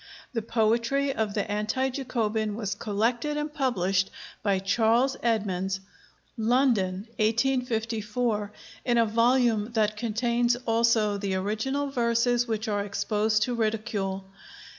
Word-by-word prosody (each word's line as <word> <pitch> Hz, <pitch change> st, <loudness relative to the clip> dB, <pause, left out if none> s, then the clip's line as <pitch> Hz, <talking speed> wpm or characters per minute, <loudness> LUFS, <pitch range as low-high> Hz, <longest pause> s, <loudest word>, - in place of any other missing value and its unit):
The 230 Hz, -, -1 dB
poetry 230 Hz, +5 st, +1 dB
of 215 Hz, -4 st, -2 dB
the 205 Hz, -, 0 dB
Anti 215 Hz, +6 st, 0 dB
Jacobin 220 Hz, -5 st, -1 dB
was 205 Hz, -3 st, -2 dB
collected 235 Hz, +9 st, -1 dB
and 295 Hz, 0 st, -3 dB
published 195 Hz, -, +1 dB, 0.3 s
by 200 Hz, -2 st, +2 dB
Charles 225 Hz, +7 st, +2 dB
Edmonds 195 Hz, -5 st, 0 dB, 0.6 s
(London, 220 Hz, -5 st, +1 dB
1854), 225 Hz, -2 st, 0 dB, 0.3 s
in 240 Hz, -1 st, +2 dB
a 230 Hz, -, +5 dB
volume 230 Hz, -1 st, +2 dB
that 215 Hz, -2 st, +1 dB
contains 235 Hz, +2 st, +1 dB
also 225 Hz, -3 st, +2 dB
the 195 Hz, -1 st, -1 dB
original 245 Hz, +9 st, -1 dB
verses 240 Hz, -1 st, +2 dB
which 220 Hz, 0 st, -2 dB
are 205 Hz, -1 st, 0 dB
exposed 215 Hz, +1 st, 0 dB
to 245 Hz, -, -1 dB
ridicule. 215 Hz, -4 st, -2 dB
225 Hz, 120 wpm, -27 LUFS, 210-245 Hz, 0.6 s, a